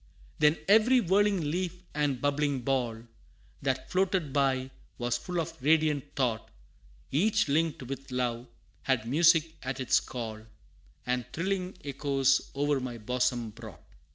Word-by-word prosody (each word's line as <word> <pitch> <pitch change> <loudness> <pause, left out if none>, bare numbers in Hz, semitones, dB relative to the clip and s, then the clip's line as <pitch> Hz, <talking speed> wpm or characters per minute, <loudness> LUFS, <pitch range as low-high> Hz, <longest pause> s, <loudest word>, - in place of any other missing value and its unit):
Then 150 +1 +4
every 225 +5 +6
whirling 195 -5 +2
leaf 180 +1 -3
and 145 -3 0
bubbling 145 -1 0
ball, 120 -3 -1 0.6
That 130 -1 -2
floated 185 -6 +1
by, 135 -2 +1 0.3
was 120 0 -1
full 175 +8 -3
of 160 - -5
radiant 150 -1 +2
thought; 120 -5 -1 0.6
Each 190 +9 +2
linked 155 0 0
with 135 +2 -7
love, 125 -1 -2 0.3
had 125 -4 0
music 165 +3 +4
at 130 +1 -4
its 130 - +3
call, 110 -3 -6 0.6
And 125 0 0
thrilling 185 +1 -2
echoes 135 -1 +1
o'er 145 0 +1
my 125 -2 -5
bosom 120 0 -1
brought. 110 -7 -11
140 Hz, 130 wpm, -29 LUFS, 125-165 Hz, 0.6 s, every